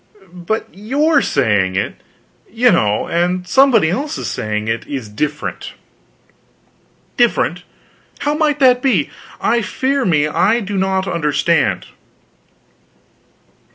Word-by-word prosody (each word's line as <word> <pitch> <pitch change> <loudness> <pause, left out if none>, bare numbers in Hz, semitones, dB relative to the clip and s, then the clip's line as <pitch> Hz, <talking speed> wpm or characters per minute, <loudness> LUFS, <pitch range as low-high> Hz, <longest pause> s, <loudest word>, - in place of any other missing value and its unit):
"But 180 +5 -3
your 280 - +1
saying 105 -8 +1
it, 95 - -1 0.6
you 240 +3 +3
know, 105 0 +1
and 180 +1 -1
somebody 230 -6 +4
else's 290 - -3
saying 105 0 -3
it, 115 0 -3
is 130 -6 -5
different." 150 +8 -4 1.4
"Different? 225 - +1 0.6
How 290 - 0
might 300 -2 +1
that 250 -2 +5
be? 225 - +1 0.3
I 235 0 +1
fear 265 +6 -1
me 155 -7 +2
I 205 +9 +2
do 205 -2 -5
not 190 0 0
understand." 165 0 0
190 Hz, 110 wpm, -17 LUFS, 150-250 Hz, 1.4 s, that